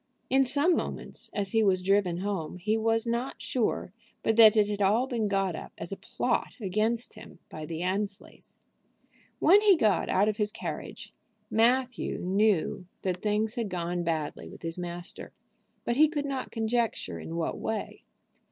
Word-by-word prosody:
In 270 +1 +5
some 290 +7 +3
moments, - - -4
as 200 -2 -2
he 225 - +3
was 190 -3 +2
driven 185 -2 +2
home, 190 -5 -3
he 210 +5 0
was 225 +1 +1
not 235 +3 -2
sure 225 -6 -1 0.3
but 225 - +2
that 220 -1 +8
it 210 -1 +5
had 205 -1 -3
all 210 +6 +3
been 235 -5 -1
got 195 -3 0
up - - -8
as 170 - -7
a - - -2
plot - - -2
against 220 +4 -1
him - - -13
by 155 -1 -7
the 165 +1 -4
Annesleys. 195 +2 -4 0.8
When 395 +5 +6
he 405 -4 +6
got 215 -8 +2
out 200 +3 +3
of 215 -1 0
his 210 -1 0
carriage - - -7 0.4
Matthew 245 +3 +2
knew 190 -2 +1 0.2
that 185 -2 0
things 210 +3 0
had 235 -4 -2
gone 175 -1 -2
badly 160 -3 -3
with - - -13
his 165 0 -2
master; 175 0 -6 0.5
but 235 - 0
he 310 +1 +6
could 295 -2 -2
not 270 -2 -3
conjecture 230 0 -1
in 165 - -6
what 165 -1 -2
way. 220 -1 -4
210 Hz, 170 wpm, -28 LUFS, 185-235 Hz, 0.8 s, that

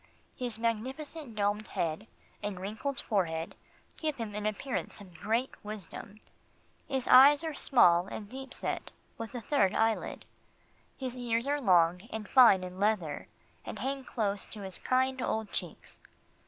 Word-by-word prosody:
His 245 -3 -4
magnificent 255 +4 -3
domed 205 0 0
head, 165 +6 -2 0.3
and 205 -3 -4
wrinkled 220 +9 -3
forehead 165 -6 -1 0.4
give 310 -2 -1
him 225 -4 -5
an 210 0 -2
appearance 220 +4 -3
of 190 -3 -13
great 225 +9 -1
wisdom. 210 0 -7 0.7
His 265 -2 -1
eyes 285 +4 +8
are 320 -1 -2
small 180 -11 +4
and 205 +1 -6
deep 265 +3 -8
set, - - -3 0.3
with 230 +2 -6
a 245 - -3
third 225 -6 +2
eyelid. 225 0 0 0.7
His 255 -2 -4
ears 235 -1 0
are 290 +1 0
long 180 -1 +3
and 215 -1 -5
fine 230 -8 +7
in 180 +1 -7
"leather," 195 -8 0 0.4
and - - -6
hang 270 0 -3
close 205 -6 -1
to 215 - -8
his 190 -2 -5
kind 260 0 +1
old 220 -2 -2
cheeks. - - -5
220 Hz, 150 wpm, -31 LUFS, 200-260 Hz, 0.7 s, eyes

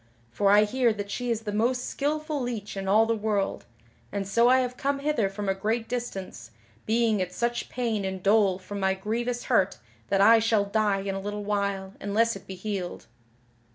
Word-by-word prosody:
For 195 +11 +2
I 205 +1 +7
hear 240 +2 +2
that 205 -1 -6
she 245 +2 -3
is 230 -1 0
the 215 -2 -4
most 245 +4 0
skilful 300 +1 -2
leech 225 -5 -4
in 195 0 -4
all 215 +3 +5
the 230 0 +1
world, 210 -2 -1 0.5
and 200 -1 -3
so 235 +4 +4
I 260 +1 +5
have 250 0 -3
come 280 +2 -1
hither 280 -8 0
from 200 +1 -5
a 195 - +2
great 220 +4 -2
distance, 195 - -5 0.4
being 225 -1 +2
in 185 -1 -1
such 235 +6 -2
pain 230 -5 -1
and 190 -1 -4
dole 200 -2 +4
from 200 +2 -7
my 190 0 +1
grievous 235 +5 -2
hurt 200 -6 +2 0.3
that 195 - +2
I 225 +3 +7
shall 220 -2 +2
die 200 -1 +1
in 195 0 -3
a 195 - -3
little 205 +1 -4
while 200 -2 -2
unless 225 +3 +1
it 195 - -11
be 190 - -6
healed." 185 -2 -5
210 Hz, 200 wpm, -27 LUFS, 195-235 Hz, 0.5 s, I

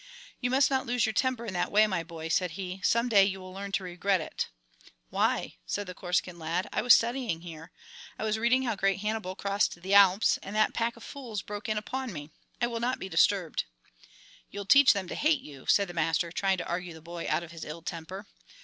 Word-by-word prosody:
"You 245 - -1
must 265 +2 +3
not 265 -2 0
lose 245 -1 +2
your 220 - -1
temper 250 +1 0
in 205 - -5
that 175 - -1
way, 215 +1 +6
my 185 -5 -1
boy," 165 -1 -7
said 180 0 +1
he. 190 0 -5
"Some 235 +1 +3
day 205 -5 +6
you 195 0 -1
will 185 0 -10
learn 200 +1 -6
to 195 - 0
regret 180 +2 0
it." 155 - -4 0.6
"Why?" - - 0
said 205 - -2
the 180 - -7
Corsican 180 0 -2
lad. 165 +3 -2
"I - - +1
was 245 +2 +8
studying 235 -7 -1
here, 165 -2 -10 0.5
I - - -4
was 220 0 0
reading 245 +3 +3
how 235 -4 -1
great 195 0 0
Hannibal 210 -3 -2
crossed 200 -2 0
the 190 +3 -3
Alps, 200 +1 +6
and 200 - -7
that 215 0 +3
pack 230 0 -1
of 230 - -13
fools 235 -8 -6
broke 210 +1 -6
in 215 - 0
upon 255 +4 -4
me. 150 -3 -8 0.3
I 240 - +2
will 235 -1 -3
not 245 +2 0
be 190 - -7
disturbed." 190 -4 +2 0.8
"You'll 200 0 -6
teach 280 +5 +7
them 195 -3 -3
to - - -5
hate 305 -2 +2
you," 140 - -12
said 200 -1 +4
the 175 - -8
master, 165 +1 0
trying 190 +2 +1
to 175 - -5
argue 175 -1 -4
the 160 - -12
boy 170 0 -6
out - - +1
of 170 - -10
his 165 -1 -8
ill 160 +2 -8
temper. 175 +5 -6
195 Hz, 230 wpm, -29 LUFS, 175-230 Hz, 0.8 s, was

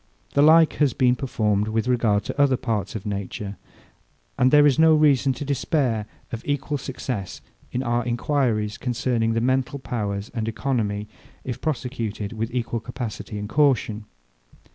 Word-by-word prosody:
The 140 - +4
like 160 +2 +6
has 145 -5 +3
been 125 -1 +3
performed 105 -5 0
with 110 +1 -1
regard 115 -5 +2
to 145 - -2
other 135 -3 +4
parts 105 -5 -2
of 105 - -5
nature. 100 0 -4 0.8
And 130 - +4
there 145 +1 +6
is 145 0 +3
no 160 0 +6
reason 145 -3 +4
to 145 - -6
despair 130 -6 0 0.2
of 115 - -4
equal 145 0 -2
success 125 -7 -5 0.3
in 125 - -2
our 120 0 0
enquiries 120 -3 0
concerning 120 -2 0
the 115 - 0
mental 130 +2 0
powers 105 -6 -4
and 115 -3 -2
economy, 110 -4 -1 0.4
if 125 - -5
prosecuted 120 -8 -3
with 115 0 -3
equal 120 -1 -2
capacity 115 -3 -6
and 105 0 -4
caution. 115 -6 +1
120 Hz, 155 wpm, -24 LUFS, 110-135 Hz, 0.8 s, like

